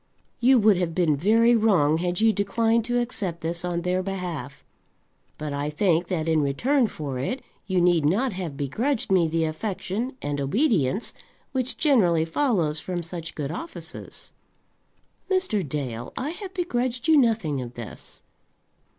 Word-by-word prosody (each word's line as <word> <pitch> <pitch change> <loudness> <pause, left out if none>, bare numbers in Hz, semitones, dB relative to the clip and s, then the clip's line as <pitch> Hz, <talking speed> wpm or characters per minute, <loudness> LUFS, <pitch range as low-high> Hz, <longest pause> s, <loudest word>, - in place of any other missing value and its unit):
You 255 +2 +5
would 210 -4 +5
have 170 -3 -1
been 170 -5 +3
very 225 +9 +4
wrong 175 -9 +3
had 175 0 -1
you 225 -1 +5
declined 225 +3 +1
to 245 0 +1
accept 200 -8 -3
this 170 +2 -3
on 175 -1 -2
their 180 +1 +1
behalf; 180 -7 -5 0.7
but 150 -1 -4
I 145 +1 -2
think 170 +1 +1
that 165 -4 -2
in 160 -1 +3
return 240 - +2
for 140 -9 -5
it 250 - -3 0.2
you 190 -2 +1
need 175 -2 +3
not 210 - +1
have 175 -7 -5
begrudged 220 - -1
me 180 -3 +4
the 165 +1 0
affection 195 +8 -3
and 145 -1 -3
obedience 200 - +1 0.4
which 260 -1 -1
generally 185 - +3
follows 165 - +1
from 175 +1 -4
such 165 -1 -7
good 145 -1 -3
offices." 330 - -8 1.0
"Mr. 370 - +2
Dale, 135 -7 -4
I 280 +5 -2
have 380 +1 -8
begrudged 255 -7 -1
you 320 - +6
nothing 220 - +2
of 120 -1 -8
this." 115 -3 -9
180 Hz, 155 wpm, -25 LUFS, 155-235 Hz, 1.0 s, you